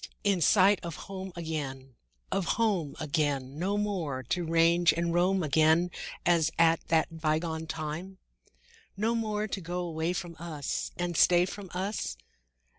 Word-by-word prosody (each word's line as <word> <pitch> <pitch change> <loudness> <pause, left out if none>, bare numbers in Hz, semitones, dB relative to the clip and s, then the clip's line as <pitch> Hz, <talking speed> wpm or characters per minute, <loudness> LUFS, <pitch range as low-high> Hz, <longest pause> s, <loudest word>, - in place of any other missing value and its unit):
In 200 -4 +2
sight 195 +4 +5
of 170 -2 -6
home 190 +1 -7
again, 140 -6 -5 0.4
Of 195 - 0
home 200 -10 +1
again; 145 -3 -1
No 195 +4 0
more 175 -11 -2
to 180 - 0
range 165 +1 +4
and 170 0 -1
roam 180 +2 +2
again 160 +4 +3 0.3
As 165 -2 +4
at 165 0 +5
that 160 0 +1
bygone 160 +1 -1
time? 160 +5 -5 0.8
No 220 +3 +1
more 215 -2 -1
to 195 -1 -4
go 175 +1 -3
away 165 0 -2
from 175 -2 -5
us 160 -4 -3
And 175 -1 -2
stay 175 +2 +5
from 195 0 -8
us? 190 - -3
170 Hz, 145 wpm, -29 LUFS, 160-190 Hz, 0.8 s, sight